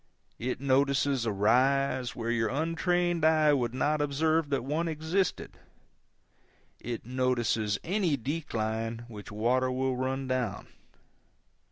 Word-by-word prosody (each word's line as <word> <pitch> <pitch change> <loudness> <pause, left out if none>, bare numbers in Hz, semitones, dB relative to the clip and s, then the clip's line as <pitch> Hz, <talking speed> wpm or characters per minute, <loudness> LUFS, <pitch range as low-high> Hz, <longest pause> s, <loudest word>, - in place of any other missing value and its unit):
It 125 +1 -2
notices 140 -1 +2
a - - +1
rise 130 +5 +2
where 115 0 -2
your 115 -2 +1
untrained 170 +3 0
eye 155 -1 +5
would 125 -3 0
not 150 +3 +1
observe 155 +2 +1
that 140 -4 0
one 155 +5 -1
existed; 160 +4 -2 1.2
it 120 -2 -5
notices 120 -4 0
any 180 -4 +1
decline 115 -5 -3
which 105 -1 -9
water 125 +5 +1
will 130 0 0
run 130 +1 -2
down. 125 -5 -2
130 Hz, 120 wpm, -29 LUFS, 120-155 Hz, 1.2 s, eye